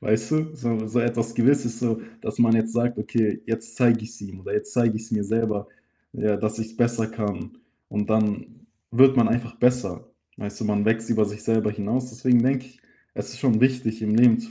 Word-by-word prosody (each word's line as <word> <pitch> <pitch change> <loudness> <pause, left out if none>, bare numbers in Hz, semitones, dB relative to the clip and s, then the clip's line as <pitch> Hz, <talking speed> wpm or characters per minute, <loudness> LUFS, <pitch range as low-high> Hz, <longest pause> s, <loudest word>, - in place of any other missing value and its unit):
weißt 110 +1 0
du, 155 0 +1
so 125 -5 -4
'ne 110 0 -3
so 120 +2 +1
etwas 115 -1 -1
Gewisses, 120 -1 +2
so 115 -2 -1 0.2
dass - - -6
man 115 -1 +5
jetzt 115 0 +1
sagt: 120 -1 0
„Okay, 110 0 0
jetzt 115 0 -4
zeige 120 -2 +4
ich's 115 +1 -11
ihm 95 -2 -9
oder - - -7
jetzt 210 0 -2
zeige 115 -2 +2
ich's 115 +1 -8
mir 105 -2 0
selber, 110 -1 -1 0.5
ja, 105 -1 0
dass 110 +1 -2
ich's 110 0 -6
besser 120 -2 +1
kann.“, 105 -4 -5 0.3
und 105 +1 -2
dann 110 +2 -1 0.2
wird 135 +3 +6
man 115 -2 +5
einfach 120 0 -1
besser. 125 -7 +1 0.3
Weißt 100 +1 -7
du, - - -2
man 105 -1 +1
wächst 115 +1 +1
über 110 -2 +3
sich 105 +1 -7
selber 110 -2 +1
hinaus. 115 +5 -2
Deswegen 125 +1 +3
denke 130 0 +1
ich, 125 -1 -22 0.3
es - - -5
ist - - -10
schon 120 -5 +3
wichtig, 125 -4 +1
im 105 0 +1
Leben 115 0 +6
zu 115 -1 -10
115 Hz, 215 wpm, -24 LUFS, 110-120 Hz, 0.5 s, wird